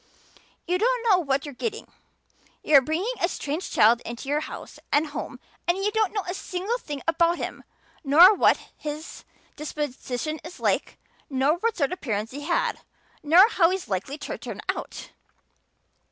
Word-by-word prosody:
You 360 +1 0
don't - - +1
know 385 -4 +5
what 275 -4 -1
you're 290 - -7
getting. 440 - -4 0.8
You're 285 -3 +6
bringing 330 - -1
a 345 - +3
strange 305 +3 -4
child 230 +3 +4
into 235 +4 -7
your 295 +1 +2
house 310 - -8
and 295 +2 +3
home 295 - -6 0.3
and 350 +1 +2
you 400 +2 0
don't 435 -3 +1
know 410 -2 -2
a 360 - -2
single 390 +5 -3
thing 290 - -7
about 335 +1 +3
him - - -5 0.4
nor 330 +8 +8
what - - +4 0.2
his 300 +1 -7 0.3
disposition 295 0 -4
is - - -10
like - - 0 0.3
nor 275 +4 +2
what 460 +3 0
sort 285 -2 +1
of 365 - -5
parents 215 -4 -2
he 285 +3 -7
had 340 +4 0 0.4
nor 340 +7 +7
how 335 -7 +4
he's 375 0 -3
likely 200 +9 -3
to - - -6
turn - - -7
out. - - -4
315 Hz, 170 wpm, -25 LUFS, 280-375 Hz, 0.8 s, nor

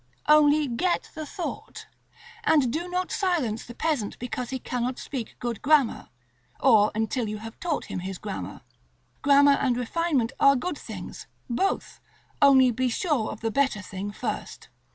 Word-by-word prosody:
Only 300 0 +5
get 305 +9 -1
the 310 -1 -6
thought, 360 +2 -6 0.6
and 290 - +3
do 345 +3 -3
not 360 +1 -2
silence 330 - 0
the 240 - -11
peasant 290 -10 -1
because 245 0 -4
he 265 - -2
cannot 250 0 -3
speak 255 -5 -6
good 240 -3 -4
grammar, 285 -4 +2 0.5
or 215 -5 +5
until 220 +1 -1
you 215 - -4
have 225 +1 -10
taught 335 -4 -2
him - - -5
his 190 +1 -5
grammar. 205 0 -6 0.6
Grammar 280 0 +5
and 250 -3 +1
refinement 260 -1 0
are 275 0 +6
good 295 +4 -3
things, - - -8 0.2
both, 320 +11 -1 0.4
only 265 -3 +6
be 255 +2 0
sure 265 -2 0
of 215 - -9
the 225 -1 -1
better 265 -6 +1
thing 195 +2 -6
first. - - -5
260 Hz, 155 wpm, -26 LUFS, 225-300 Hz, 0.6 s, are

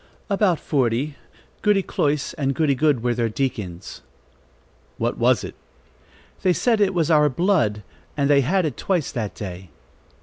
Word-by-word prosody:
"About 195 -4 +2
forty. 135 +1 0 0.5
Goody 205 -2 +3
Cloyse 145 -3 -1
and 135 -4 -1
Goody 150 -1 +2
Good 140 -3 +1
were 120 -1 +1
their 120 -1 0
deacons." 105 -8 -4 1.0
"What - - -2
was - - +3
it?" - - -6 0.9
"They 185 - +3
said 225 +2 +1
it 195 -2 +2
was 165 -2 +1
our 150 -1 +5
blood, 130 - +1 0.3
and 140 -1 +2
they 140 -1 +5
had 180 +7 +1
it 145 -7 -3
twice 175 -7 -1
that 110 -5 -4
day." 95 -3 -7
145 Hz, 155 wpm, -22 LUFS, 120-175 Hz, 1.0 s, our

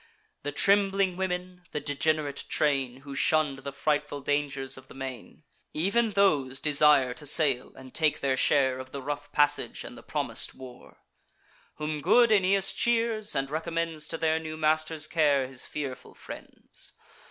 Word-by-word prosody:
The 145 - -4
trembling 195 +2 +3
women, 180 -1 -4
the 150 - -1
degenerate 145 0 -1
train, 135 -4 0
Who 140 0 -9
shunn'd 150 -1 +1
the 140 +1 -6
frightful 150 0 -1
dangers 140 -1 -1
of 130 0 -12
the - - -14
main, 130 -3 -8 0.3
Ev'n 210 +7 +1
those 145 -10 +2
desire 145 -4 +4
to 150 +3 -5
sail, 140 -4 +3
and 130 -1 -13
take 155 -2 +2
their 135 -1 0
share 130 -1 +2
Of 130 0 -9
the 140 - -5
rough 145 +1 -5
passage 145 0 +1
and - - -9
the - - -12
promis'd - - -3
war: 130 -2 -13 0.7
Whom 150 -1 -4
good 235 - +5
Aeneas 195 -1 +3
cheers, 230 -2 +1
and 135 0 -2
recommends 165 -1 -3
To - - -4
their 160 0 +1
new 155 -1 -7
master's 155 0 +1
care 145 -4 +2
his 130 -1 +1
fearful 140 -4 -6
friends. - - -7
150 Hz, 155 wpm, -28 LUFS, 135-165 Hz, 0.7 s, good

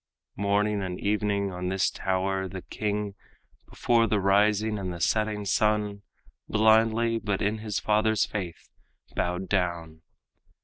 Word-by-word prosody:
Morning 100 +1 +1
and 90 -1 -4
evening 100 -1 0
on 90 0 -4
this 95 0 +1
tower 95 0 -1
the 95 0 -7
king, 105 -1 -3 0.6
Before 115 -1 +2
the 105 -1 +1
rising 105 +2 +2
and 95 -2 -4
the 85 - -7
setting 105 +3 0
sun, 105 0 +1 0.5
Blindly, 110 +1 +3
but 100 -3 -2
in 105 +2 -1
his 105 -2 -3
father's 110 0 +2
faith, 90 -5 -6 0.4
bowed 90 +2 -1
down. 85 -4 -2
100 Hz, 130 wpm, -27 LUFS, 95-105 Hz, 0.6 s, Blindly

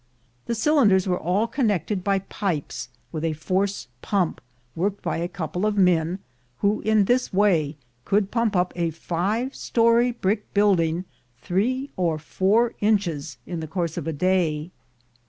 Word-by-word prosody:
The 235 - 0
cylinders 225 - +4
were 180 -1 +1
all 185 +6 +1
connected 210 - -1
by 195 0 +2
pipes 175 -8 -3 0.2
with 155 -1 -4
a 165 -1 0
force 190 +6 -1
pump, 190 -5 0 0.3
worked 200 +4 -1
by 170 - -1
a 170 +1 -1
couple 175 +1 -4
of 210 -1 +1
men, 180 -2 +3 0.4
who 205 +1 +2
in 215 -2 +3
this 245 +4 +1
way 170 -7 +2 0.3
could 200 +3 +1
pump 230 -3 +1
up 180 0 +1
a 170 -1 0
five 195 - -2
story 235 +1 +3
brick 210 -2 -2
building 180 -4 +2 0.3
three 245 - -1
or 170 -4 +1
four 200 +9 +1
inches 170 - 0
in 175 -2 -4
the 160 - -5
course 170 0 -2
of - - -4
the 160 - -1
day. 165 -1 0
190 Hz, 155 wpm, -24 LUFS, 165-210 Hz, 0.4 s, cylinders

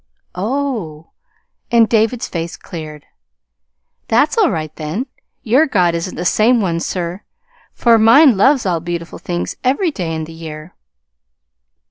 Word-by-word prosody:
"Oh!" 210 - -3 0.6
and 230 -2 +4
David's 225 +2 +1
face 170 0 -5
cleared. 155 -4 -9 1.0
"That's 245 +7 +2
all 445 -4 +3
right, 155 -5 -4
then. 160 - -4 0.4
Your 265 +6 +3
God 180 - +2
isn't 170 +2 -4
the 175 - -4
same 230 +6 +3
one, 170 -5 -1
sir, 175 +2 -4 0.5
for 230 -2 +4
mine 235 +4 +6
loves 260 +6 +3
all 175 -3 0
beautiful 170 0 -6
things 175 -1 -4
every 280 +7 +1
day 170 - -4
in 160 - -3
the 160 +1 -9
year." 160 0 -9
185 Hz, 135 wpm, -17 LUFS, 165-240 Hz, 1.0 s, mine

